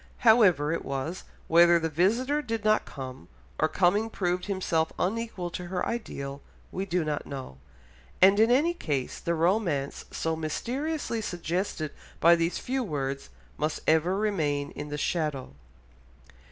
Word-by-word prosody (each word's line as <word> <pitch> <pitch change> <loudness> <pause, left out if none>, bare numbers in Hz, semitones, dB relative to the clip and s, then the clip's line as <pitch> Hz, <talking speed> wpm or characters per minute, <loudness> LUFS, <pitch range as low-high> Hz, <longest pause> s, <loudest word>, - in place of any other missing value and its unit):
However 185 -10 +5
it 165 - -2
was, 140 +6 -4 0.2
whether 170 +1 +6
the 165 -1 0
visitor 230 - +1
did 225 -5 -4
not 215 0 +3
come, 130 -2 -8 0.3
or 155 - +4
coming 195 +7 +2
proved 180 -4 -1
himself 175 -5 0
unequal 195 -3 -2
to 180 0 -5
her 180 0 -2
ideal, 140 -12 -5 0.3
we 195 +1 -3
do 180 -2 0
not 150 -1 -3
know, 130 - -7 0.6
and 195 +2 +6
in 225 +1 +5
any 295 +8 +3
case 145 - -3
the 170 - -1
romance 165 -5 0
so 160 0 -2
mysteriously 240 - -2
suggested 175 -4 -3 0.3
by 170 +1 +7
these 170 +1 0
few 265 +1 -2
words, 140 - -3 0.3
must 155 +1 -1
ever 165 +4 +3
remain 155 -9 0
in 150 +1 -7
the 145 - -3
shadow. 150 - -2
175 Hz, 145 wpm, -28 LUFS, 150-215 Hz, 0.6 s, by